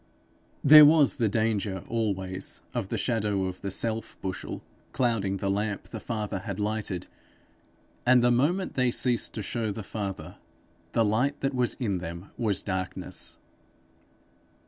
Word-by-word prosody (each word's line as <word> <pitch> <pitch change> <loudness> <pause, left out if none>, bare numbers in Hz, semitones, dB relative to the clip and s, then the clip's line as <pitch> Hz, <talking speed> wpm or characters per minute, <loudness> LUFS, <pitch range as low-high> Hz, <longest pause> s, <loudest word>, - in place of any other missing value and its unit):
There 150 +2 +11
was 150 -1 +6
the 115 -5 +2
danger 105 -3 0
always 95 -5 -2
of 95 - -2
the - - -1
shadow 105 -5 0
of 90 -1 -5
the 100 - -3
self 110 +3 -1
bushel 95 -1 -5 0.3
clouding 110 -6 +1
the 100 +1 -1
lamp 100 0 -2
the 110 - -6
Father 105 -3 -3
had 100 0 -5
lighted; 105 -3 -2 1.0
and 125 0 +5
the 120 - +5
moment 165 +10 +1
they 130 -1 +2
ceased 120 -1 0
to 110 - -3
show 110 +2 -2
the 105 +2 -6
Father, 95 -5 -5 0.6
the 115 - +3
light 125 +7 +1
that 135 0 0
was 125 -2 +1
in 100 -7 -1
them 85 +2 -7
was 105 -5 0
darkness. 95 -2 -4
110 Hz, 145 wpm, -27 LUFS, 95-120 Hz, 1.0 s, There